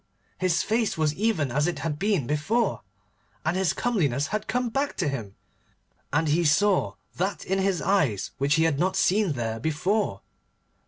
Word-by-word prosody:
his 185 -3 +1
face 220 -2 0
was 155 -2 +1
even 185 - 0
as 150 +5 +1
it 175 - -2
had 150 -2 -3
been, 200 -5 +2 1.2
and 160 +3 +1
his 190 -2 +2
comeliness 150 - 0
had 215 +1 -3
come 250 +2 0
back 275 +5 -2
to 175 - 0
him, 115 -8 -4 0.8
and 155 +2 +1
he 165 +4 +2
saw 190 +5 +2 0.2
that 190 +1 -2
in 190 +1 0
his 190 -2 0
eyes 150 - +1
which 140 +3 +2
he 160 - +3
had 160 -4 +1
not 185 +3 +1
seen 195 -2 +2
there 115 -3 -3
before. 180 - -1
175 Hz, 165 wpm, -26 LUFS, 150-205 Hz, 1.2 s, he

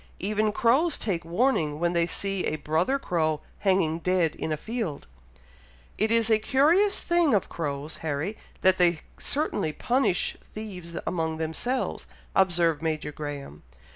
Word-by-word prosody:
Even 215 +2 0
crows 270 +10 +3
take 185 -6 -2
warning 165 - +1
when 170 +1 +1
they 170 -1 +2
see 195 0 -2
a - - 0
brother 160 - +1
crow 155 - 0 0.2
hanging 185 -5 +2
dead 175 -2 +1
in 160 - -4
a 155 - 0
field." 215 -6 -4 0.9
"It 220 +1 +1
is 230 -1 +3
a 220 - +5
curious 330 - +3
thing 345 -7 +3
of 195 - 0
crows, 145 -1 -4
Harry, 160 +6 -3 0.3
that 185 0 +4
they 175 -2 +3 0.2
certainly 210 - 0
punish 245 - +1
thieves 180 -6 -8
among 160 -2 -1
themselves," 160 +11 -2 0.3
observed 175 -4 +3
Major 155 -2 -2
Graham. 145 - -7
180 Hz, 140 wpm, -27 LUFS, 160-220 Hz, 0.9 s, a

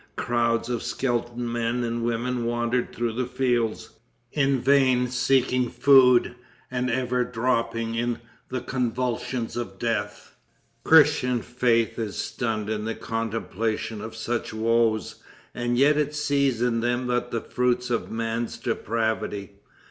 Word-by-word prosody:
Crowds 115 -1 0
of 120 -2 -2
skeleton 120 -1 -2
men 120 +1 -1
and 115 0 -2
women 120 +1 -1
wandered 120 +1 -1
through 120 -1 -2
the 125 +1 -2
fields, 120 -3 -1 0.4
in 135 -2 +2
vain 130 -1 +3
seeking 125 0 +2
food, 125 -4 +5 0.4
and 125 0 -1
ever 125 0 0
dropping 115 -1 -1
in 120 +1 -1 0.3
the 130 -1 -3
convulsions 125 -1 -2
of 115 -6 -5
death. 105 -2 -3 0.5
Christian 145 -6 +5
faith 120 -2 +1
is 110 -3 -3
stunned 110 -3 -2
in 105 -1 -2
the 115 - -2
contemplation 115 -1 -3
of 110 0 -7
such 115 +1 -3
woes, 110 -1 +1 0.3
and 120 0 -1
yet 145 +3 +5
it 150 0 0
sees 140 -5 +1
in 120 -2 +1
them 120 +2 0
but 125 0 -1
the 115 - -1
fruits 125 0 0
of 115 - -1
man's 115 +1 -3
depravity. 110 -4 -2
120 Hz, 135 wpm, -25 LUFS, 115-125 Hz, 0.5 s, food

